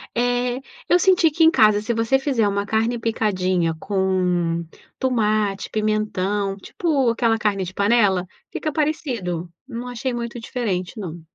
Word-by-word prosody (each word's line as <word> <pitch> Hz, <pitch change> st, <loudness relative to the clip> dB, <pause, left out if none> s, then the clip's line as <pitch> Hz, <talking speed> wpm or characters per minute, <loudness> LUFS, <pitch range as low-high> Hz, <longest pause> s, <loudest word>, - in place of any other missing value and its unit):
Eh 245 Hz, +1 st, 0 dB, 0.3 s
eu 355 Hz, -, +5 dB
senti 360 Hz, -3 st, +4 dB
que 325 Hz, +2 st, +2 dB
em 320 Hz, -, +7 dB
casa 215 Hz, -6 st, +4 dB
se 235 Hz, +2 st, -1 dB
você 230 Hz, +4 st, +2 dB
fizer 265 Hz, -6 st, +1 dB
uma 200 Hz, 0 st, -1 dB
carne 225 Hz, +3 st, 0 dB
picadinha 185 Hz, -7 st, 0 dB
com 180 Hz, -4 st, 0 dB, 0.4 s
tomate, 215 Hz, -6 st, 0 dB
pimentão, 210 Hz, -2 st, 0 dB
tipo 275 Hz, -, 0 dB
aquela 230 Hz, -1 st, +2 dB
carne 205 Hz, -3 st, 0 dB
de 185 Hz, +1 st, -6 dB
panela, 200 Hz, -3 st, +3 dB, 0.3 s
fica 310 Hz, -, -3 dB
parecido. 245 Hz, -, -2 dB, 0.2 s
Não 245 Hz, -1 st, -6 dB
achei 245 Hz, +1 st, -3 dB
muito 235 Hz, 0 st, -4 dB
diferente 215 Hz, -5 st, -3 dB
não. 175 Hz, -3 st, -6 dB
215 Hz, 145 wpm, -22 LUFS, 195-245 Hz, 0.4 s, em